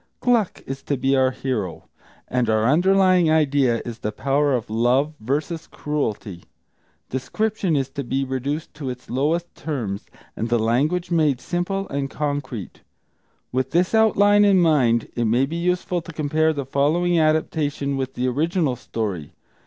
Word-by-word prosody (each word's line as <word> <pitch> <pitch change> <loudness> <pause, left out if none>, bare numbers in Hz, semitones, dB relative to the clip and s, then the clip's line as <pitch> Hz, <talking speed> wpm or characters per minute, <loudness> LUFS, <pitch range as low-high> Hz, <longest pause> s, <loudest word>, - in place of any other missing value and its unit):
Gluck 235 -6 +1
is 135 0 -6
to 140 - -1
be 135 +2 +2
our 130 -1 +4
hero, 125 -9 -4 0.4
and 125 -2 0
our 110 0 +2
underlying 185 +4 +4
idea 140 -6 +2
is 120 -1 -6
the 105 - -3
power 140 +4 +1
of 120 - -3
love 125 +7 +1
versus 150 +7 -3
cruelty. 110 - -4 0.7
Description 195 - -1
is 135 -2 0
to 140 - -5
be 135 +2 -1
reduced 135 +4 -3
to 145 -3 -5
its 125 0 -8
lowest 155 +7 0
terms, 115 -11 -4 0.3
and 115 - -3
the 120 - +3
language 140 +11 0
made 155 -6 +2
simple 195 +5 -2
and 140 0 -2
concrete. 145 - -4 0.7
With 130 +1 -1
this 180 +4 +1
outline 205 -2 +5
in 200 -2 +5
mind, 130 -9 +3
it 120 - 0
may 120 +4 +3
be 160 +5 -5
useful 180 0 0
to 165 - -10
compare 155 +1 +1
the 140 -3 -4
following 165 +6 +2
adaptation 155 -2 0
with 130 -1 -3
the 125 +1 -1
original 155 +1 0
story. 100 - -4
140 Hz, 155 wpm, -22 LUFS, 125-165 Hz, 0.7 s, outline